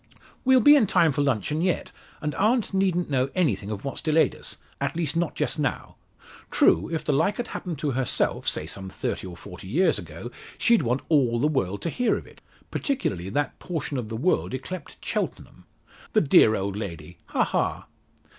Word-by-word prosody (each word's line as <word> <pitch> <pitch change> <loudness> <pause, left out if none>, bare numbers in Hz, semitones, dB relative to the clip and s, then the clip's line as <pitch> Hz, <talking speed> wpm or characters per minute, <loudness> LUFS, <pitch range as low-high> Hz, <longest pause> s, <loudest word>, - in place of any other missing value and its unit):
"We'll 260 -1 +5
be 290 +5 +8
in 250 -8 +4
time 165 -3 +4
for 145 - -1
luncheon 140 - 0
yet, 180 0 0 0.3
and 150 0 -1
aunt 220 +1 +1
needn't 185 -4 +1
know 130 0 +1
anything 115 - +1
of 105 +1 -5
what's 135 - -4
delayed 160 0 +3
us - - -5 0.2
at - - -2
least, 165 -2 -1
not 170 -1 0
just - - -1
now. 145 - -2 0.5
True, 85 - +3
if 160 - -2
the 150 - +2
like 165 +9 +2
had 240 - -3
happened 175 -4 -5
to 145 0 -1
herself 130 -1 0
say 75 - 0
some 95 +3 -5
thirty 95 - -4
or 90 -1 -9
forty 90 +2 -10
years 170 - +2
ago 85 +8 -8 0.3
she'd 235 -2 +4
want 125 +3 0
all 125 -7 +3
the 145 - +3
world 100 -10 -1
to 170 - -1
hear 245 +7 +1
of - - -8
it, - - -17 0.3
particularly 95 - -2
that 145 +8 -2
portion 155 -6 -3
of 110 -3 -5
the 110 - -4
world 160 0 +1
yclept 150 +5 -7
Cheltenham. - - -4 0.5
The - - +5
dear 115 -7 +6
old 100 0 -2
lady! 85 -5 -7
Ha, - - +1
ha!" - - -1
145 Hz, 195 wpm, -25 LUFS, 105-175 Hz, 0.5 s, be